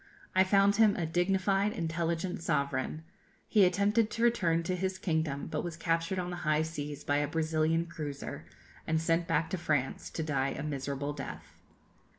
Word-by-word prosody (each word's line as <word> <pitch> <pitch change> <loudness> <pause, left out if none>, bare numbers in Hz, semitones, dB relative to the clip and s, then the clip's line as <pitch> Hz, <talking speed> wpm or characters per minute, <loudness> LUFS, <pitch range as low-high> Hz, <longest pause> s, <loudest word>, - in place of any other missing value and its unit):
I 185 - +6
found 200 +1 +4
him 215 -2 +5
a 170 - -1
dignified, 195 +4 +1
intelligent 170 +1 -2
sovereign. 140 0 -1 0.4
He 205 -3 +5
attempted 205 +4 +2
to 230 - -2
return 175 -9 +3
to 185 +2 -1
his 190 +1 -2
kingdom, 160 -6 -1
but 155 - -3
was 170 -3 -5
captured 165 +2 0
on 180 -1 -2
the 175 - -4
high 155 -2 +1
seas 150 -3 -5
by 145 - +1
a 145 0 +1
Brazilian 160 +1 +1
cruiser, 155 -5 -6 0.4
and 160 0 +2
sent 165 +1 +1
back 165 -1 +1
to 185 - -1
France 145 -5 -1
to 160 - -3
die 140 -3 0
a - - -4
miserable 140 0 -3
death. 140 - -8
165 Hz, 170 wpm, -31 LUFS, 150-185 Hz, 0.4 s, I